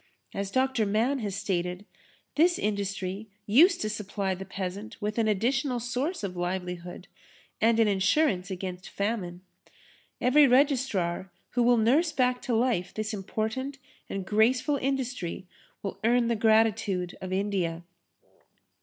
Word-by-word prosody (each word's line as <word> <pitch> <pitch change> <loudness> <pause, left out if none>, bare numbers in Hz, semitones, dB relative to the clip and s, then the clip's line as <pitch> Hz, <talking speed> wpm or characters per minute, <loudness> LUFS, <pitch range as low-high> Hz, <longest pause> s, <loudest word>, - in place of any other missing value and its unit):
As 200 0 -3
Dr. 260 -1 +1
Mann 230 +7 +1
has 205 -4 -3
stated, 180 -1 -2 0.5
this 345 +3 +4
industry 200 0 -3 0.2
used 325 - +5
to 215 - 0
supply 205 -2 -2
the 190 +1 -7
peasant 195 +3 -6
with 210 +1 -2
an 225 - +2
additional 245 +5 +1
source 250 - -2
of 185 -2 -3
livelihood 180 0 -4 0.5
and 225 +1 +4
an 225 - +5
insurance 195 - +2
against 185 -1 -5
famine. 200 -4 -3 0.8
Every 280 +4 +5
registrar 250 - +2 0.2
who 245 - +1
will 240 0 +5
nurse 275 +10 +3
back 250 -3 +1
to 240 - -1
life 225 -7 0
this 215 0 -3
important 220 +7 -3 0.3
and 195 -1 -4
graceful 245 - +2
industry 255 -10 -3 0.4
will 195 - -5
earn 235 +1 +3
the 235 - +2
gratitude 220 -4 +2
of 185 0 -5
India. 185 -4 -1
215 Hz, 135 wpm, -28 LUFS, 190-250 Hz, 0.8 s, used